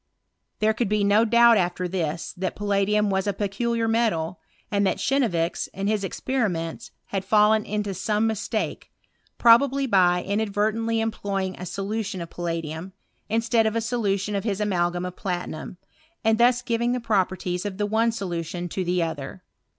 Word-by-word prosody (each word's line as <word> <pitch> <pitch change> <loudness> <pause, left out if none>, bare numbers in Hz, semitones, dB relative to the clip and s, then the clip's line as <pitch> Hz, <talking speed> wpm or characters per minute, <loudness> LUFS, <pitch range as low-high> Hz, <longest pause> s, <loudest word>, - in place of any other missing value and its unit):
There 215 +1 +2
could 225 -2 -1
be 210 -1 +1
no 205 +3 +4
doubt 235 0 +6
after 180 -1 0
this, 170 -3 -3
that 185 +1 -3
palladium 205 0 +1
was 190 +1 0
a 205 - +1
peculiar 225 +3 -1
metal, 185 -8 0 0.3
and 200 -1 +2
that - - 0
Cheiievix, 180 -12 0
in 195 - -3
his 210 -1 0
ex 195 - -5
periments, 185 -11 -2 0.2
had 195 -1 -2
fallen 210 +2 +4
into 205 -1 -2
some 210 +4 0
mistake, 220 -2 -2 0.5
probably 270 +4 +5
by 180 -6 +3
inadvertently 220 +2 0
employing 195 -4 -2
a 180 - -5
solution 205 +1 -3
of 170 -1 -7
palladium, 165 +1 -4 0.4
instead 225 0 +2
of 220 - -1
a - - +2
solution 210 -3 -1
of 200 - -1
hia 210 -3 0
amalgam 175 -3 0
of 180 0 -6
platinum; 180 -2 -4 0.5
and 220 0 +3
thus 245 +1 +4
giving 235 0 0
the 250 - -1
properties 185 -5 0
of 205 -2 -4
the 205 - 0
one 225 +2 +2
solution 175 -4 -4
to 185 - -2
the 180 0 +1
other. 160 +2 -5
205 Hz, 165 wpm, -25 LUFS, 180-225 Hz, 0.5 s, doubt